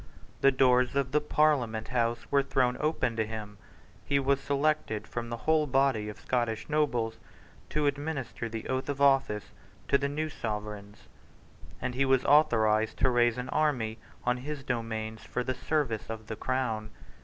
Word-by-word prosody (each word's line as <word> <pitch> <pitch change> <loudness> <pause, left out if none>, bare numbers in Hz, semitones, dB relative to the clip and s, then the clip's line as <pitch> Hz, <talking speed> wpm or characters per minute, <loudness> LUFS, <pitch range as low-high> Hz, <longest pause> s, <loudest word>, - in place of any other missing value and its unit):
The 135 - +6
doors 125 -1 +3
of 135 -2 0
the 150 +1 +3
Parliament 135 -8 +1
House 115 -1 0
were 140 -1 +5
thrown 130 -2 +1
open 140 -6 0
to 110 - +2
him: 105 -2 -7 0.4
he 140 - +1
was 140 0 +2
selected 140 -6 0
from 120 -1 -5
the 120 - -3
whole 155 -1 +3
body 130 -5 +2
of 105 - -9
Scottish 120 -3 -1
nobles 125 -7 0 0.5
to 150 -1 0
administer 140 -5 -2
the 110 0 -5
oath 130 +2 -2
of 140 -1 -2
office 135 -7 +2 0.4
to 140 - +4
the 140 - -1
new 155 +2 -2
Sovereigns; 105 -6 -6 0.7
and 125 +1 -3
he 135 +2 +1
was 130 -1 +3
authorised 110 -7 +4
to 130 - +3
raise 120 -1 +3
an 125 +1 -4
army 120 -8 0 0.3
on 125 0 +2
his 140 +2 -6
domains 110 -3 -3
for 125 - -3
the 130 - -1
service 130 -7 -1
of 110 -1 -6
the 110 - -5
Crown. 115 -4 -2
125 Hz, 165 wpm, -29 LUFS, 110-140 Hz, 0.7 s, The